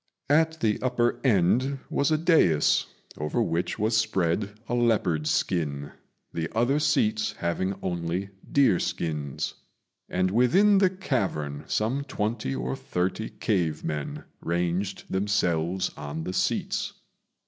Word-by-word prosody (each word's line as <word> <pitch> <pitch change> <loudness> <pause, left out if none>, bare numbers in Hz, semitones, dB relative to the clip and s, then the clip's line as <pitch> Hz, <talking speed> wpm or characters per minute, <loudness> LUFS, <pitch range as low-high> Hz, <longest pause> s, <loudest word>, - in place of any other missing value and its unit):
At 160 +1 +3
the 105 -2 +1
upper 120 -2 +1
end 125 +4 +3
was 140 - +2
a 155 - +3
dais, 155 - +3 0.3
over 75 0 -1
which 85 +2 0
was 110 +2 +1
spread 100 -1 0
a - - -3
leopard's 105 -10 +2
skin, 70 -5 -1 0.4
the 80 -1 -2
other 130 +6 +3
seats 215 +9 +1
having 95 +3 -1
only 90 +2 -2 0.2
deer 130 -10 +4
skins; 75 -6 -3 0.6
and 95 +1 +1
within 190 - +5
the 190 -2 +5
cavern 95 - -2
some 120 +6 0
twenty 105 - -2
or 65 +1 -2
thirty 95 +5 -2
cave 85 -8 -1
men 75 -2 -4 0.2
ranged 85 +3 -1
themselves 95 -3 0
on 75 +2 -5
the 90 - -4
seats. - - -1
95 Hz, 125 wpm, -27 LUFS, 85-125 Hz, 0.6 s, within